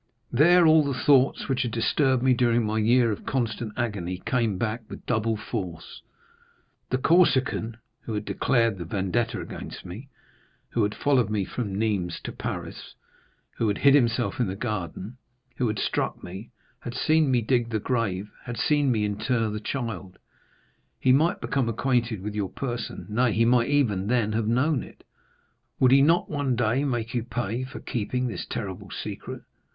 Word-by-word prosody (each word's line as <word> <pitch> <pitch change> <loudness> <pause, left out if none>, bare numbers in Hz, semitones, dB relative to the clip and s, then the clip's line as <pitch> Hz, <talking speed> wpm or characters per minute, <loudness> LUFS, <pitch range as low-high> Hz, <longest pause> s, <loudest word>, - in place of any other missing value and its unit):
There 170 +7 +6
all 160 -1 +6
the 140 -3 -2
thoughts 135 -2 +3
which 135 -1 0
had 120 - 0
disturbed 125 +3 +1
me 130 -1 +5
during 120 -1 +2
my 110 +1 0
year 115 +1 +4
of 105 - -5
constant 115 -3 -2
agony 100 -7 -2
came 115 -6 +1
back 110 +3 -2
with - - -9
double 110 -2 0
force. 90 -8 -6 0.9
The 130 - +1
Corsican, 130 -7 +2 0.2
who 110 - -5
had 105 0 -3
declared 115 -6 +1
the 85 - -5
vendetta 105 +7 -1
against - - -8
me, 110 +10 -9 0.6
who 120 - 0
had 105 0 0
followed 130 -6 +2
me 105 -3 0
from 105 -4 -4
Nîmes 100 -5 -1
to - - -5
Paris, - - -6 0.6
who 115 - +1
had 100 - 0
hid 140 -1 +5
himself 120 -3 +2
in 120 - +2
the 95 - -3
garden, 105 +1 -4 0.4
who 125 - +1
had 105 -1 -2
struck - - -2
me, 95 +6 -8 0.3
had 120 0 -7
seen 155 +2 +3
me 125 -2 +3
dig 120 0 +1
the 110 -2 -1
grave, 105 -4 -2
had 120 -1 -5
seen 145 +2 +2
me 110 -3 +1
inter 110 +2 -1
the 105 - -3
child,—he 115 +1 -5
might 155 +6 +3
become 130 -4 -1
acquainted 120 -3 0
with 105 0 -4
your 105 -3 -2
person,—nay, 120 -2 -2
he 115 +2 +3
might 120 +1 +3
even 110 -10 +1
then 115 -2 +1
have 110 0 -1
known 130 +5 +2
it. - - -13 0.8
Would 130 -1 +5
he 135 +1 +7
not 165 +5 +3
one 145 -4 -1
day 120 +3 +1
make 120 -5 -2
you 120 -2 -1
pay 120 0 -3
for 130 - -9
keeping 125 +2 -2
this 120 - -4
terrible 95 -4 -5
secret? - - -6
115 Hz, 170 wpm, -26 LUFS, 105-130 Hz, 0.9 s, he